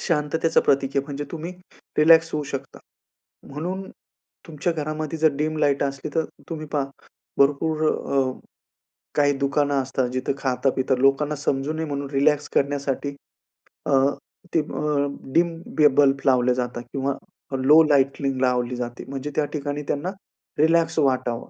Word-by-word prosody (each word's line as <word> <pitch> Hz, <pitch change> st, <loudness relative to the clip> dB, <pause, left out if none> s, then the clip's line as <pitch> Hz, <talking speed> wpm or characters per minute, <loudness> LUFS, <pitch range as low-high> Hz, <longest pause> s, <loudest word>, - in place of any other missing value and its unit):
शांततेचं 160 Hz, 0 st, +1 dB
प्रतीक 135 Hz, -1 st, +2 dB
आहे 140 Hz, -, +2 dB
म्हणजे 145 Hz, 0 st, -5 dB
तुम्ही 165 Hz, +2 st, -5 dB, 0.5 s
रिलॅक्स 165 Hz, +1 st, +6 dB
होऊ 150 Hz, -, 0 dB
शकता. 135 Hz, -1 st, -6 dB, 0.7 s
म्हणून 180 Hz, +7 st, -5 dB, 0.6 s
तुमच्या 165 Hz, +2 st, -2 dB
घरामध्ये 155 Hz, 0 st, -4 dB
जर 155 Hz, -1 st, +4 dB
डीम 155 Hz, +1 st, -1 dB
लाईट 140 Hz, -2 st, +2 dB
असली, 135 Hz, -1 st, -4 dB
तर 160 Hz, -, +2 dB, 0.3 s
तुम्ही 155 Hz, -1 st, -5 dB
पहा 145 Hz, -2 st, +1 dB, 0.5 s
भरपूर 155 Hz, +3 st, +2 dB
अ, 135 Hz, -1 st, 0 dB, 0.9 s
काही 145 Hz, -1 st, +4 dB
दुकानं 140 Hz, +1 st, +1 dB
असतात 130 Hz, -1 st, -1 dB
जिथं 130 Hz, +1 st, -1 dB
खाता-पिता, 130 Hz, 0 st, +1 dB
लोकांना 135 Hz, +3 st, +2 dB
समजू 140 Hz, +1 st, -1 dB
नये 160 Hz, 0 st, -2 dB
म्हणून 140 Hz, -1 st, -4 dB
रिलॅक्स 145 Hz, +1 st, +2 dB
करण्यासाठी 140 Hz, 0 st, 0 dB, 0.7 s
अ, -, -, 0 dB, 0.6 s
ते -, -, +4 dB
अ, 150 Hz, -1 st, -1 dB, 0.3 s
डीम 170 Hz, 0 st, +3 dB, 0.2 s
बी 150 Hz, -, +7 dB
बल्ब 140 Hz, 0 st, +3 dB
लावले 125 Hz, -1 st, +4 dB
जातात 120 Hz, -1 st, -3 dB
किंवा 140 Hz, 0 st, -1 dB, 0.5 s
लो 150 Hz, +4 st, +8 dB
लायटलींग 135 Hz, -2 st, +1 dB
लावली 125 Hz, -1 st, +1 dB
जाते. 120 Hz, -1 st, -5 dB
म्हणजे 140 Hz, +2 st, -5 dB
त्या 155 Hz, -, +2 dB
ठिकाणी 145 Hz, 0 st, -3 dB
त्यांना 145 Hz, +5 st, -1 dB, 0.5 s
रिलॅक्स 165 Hz, +1 st, +3 dB
वाटावं. 130 Hz, -4 st, 0 dB
145 Hz, 140 wpm, -23 LUFS, 135-155 Hz, 0.9 s, लो